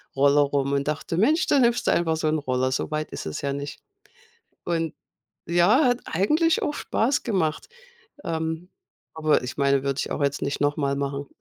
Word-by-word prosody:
Roller 140 +1 +4
rum 140 -1 0
und 140 +1 0
dachte: 155 +2 -2
„Mensch, 300 - +3
da 285 - +4
nimmst 240 -1 +2
du - - +5
einfach 165 -2 +1
so 155 - -1
'n 155 +1 +2
Roller, 130 -2 -1
so 130 - -2
weit 155 0 -3
ist - - -6
es 75 - -5
ja 140 -1 -1
nicht.“ 140 0 -6 0.8
Und, 165 -2 -1 0.5
ja, 175 - +4
hat 245 -1 +2
eigentlich 305 - +2
auch 295 - -1
Spaß 260 -1 0
gemacht. 175 -9 -1 0.6
Ähm, 160 +2 -3 0.4
aber 155 -3 +2
ich 125 - -6
meine, 140 -1 +2
würde 140 0 -1
ich - - -4
auch - - -3
jetzt 140 0 0
nicht 140 - -2
nochmal 145 -1 0
machen. 140 0 -3
155 Hz, 190 wpm, -24 LUFS, 140-175 Hz, 0.8 s, du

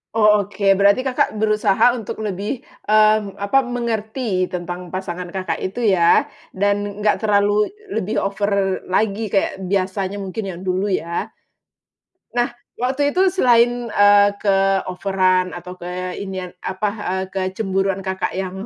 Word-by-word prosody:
Oh, 210 -3 +4
oke. 205 0 -8 0.2
Berarti 200 +5 +4
Kakak 260 -4 0
berusaha 215 +1 +3
untuk 225 -2 -5
lebih, 210 +6 -3 0.2
mmm, 215 -1 +3
apa, 200 +7 +2
mengerti 225 -4 -2
tentang 180 0 -5
pasangan 180 0 -5
Kakak 185 +1 -3
itu 200 +6 -4
ya. 185 -6 +4 0.3
Dan 205 +1 -1
nggak 210 - +2
terlalu 205 0 +2 0.2
lebih 210 - -2
over 200 -1 0
lagi 210 +3 0
kayak 195 -1 0
biasanya 190 0 -1
mungkin 195 +3 -4
yang 180 -2 -6
dulu 185 +2 0
ya. 170 -3 -2 1.1
Nah 240 0 +1 0.2
waktu 270 +3 0
itu 375 +1 +4
selain, 245 -8 +3
eee, 205 0 +6
keoveran 195 -1 +1
atau 180 +1 -8
ke 180 +1 -5
inian, 190 -2 -5
apa, 190 +3 -2 0.2
eee, 190 0 -1
kecemburuan 195 0 -1
Kakak 190 0 -3
yang 190 +1 -4
200 Hz, 130 wpm, -20 LUFS, 185-215 Hz, 1.1 s, eee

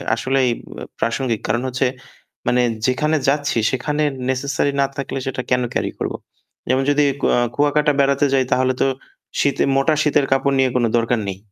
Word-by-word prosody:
আসলেই 130 +1 +1
ব - - -12 0.4
প্রাসঙ্গিক। 115 -1 -1
কারণ 120 - 0
হচ্ছে, 130 0 0 0.6
মানে 125 0 +3 0.3
যেখানে 150 +5 +1
যাচ্ছি, 145 -2 0
সেখানে 145 +4 -1 0.3
নেসেসারি 140 +2 0
না - - +4
থাকলে 140 -1 -4
সেটা 135 -1 -2
কেন 125 - +3
ক্যারি - - -1
করব? - - -2 0.6
যেমন 130 +1 +2
যদি 145 0 +3 0.2
ক - - -15 0.3
কুয়াকাটা 150 +1 +2
বেড়াতে 140 +1 +3
যাই, 135 - +3
তাহলে 130 0 +2
তো - - +4 0.5
শীতের 140 -1 +2
মোটা 135 +3 +3
শীতের 150 -2 +2
কাপড় 135 +1 +2
নিয়ে 130 -1 +3
কোনো 120 -2 +2
দরকার 115 0 +1
নেই। 95 - -5
135 Hz, 165 wpm, -20 LUFS, 125-145 Hz, 0.6 s, না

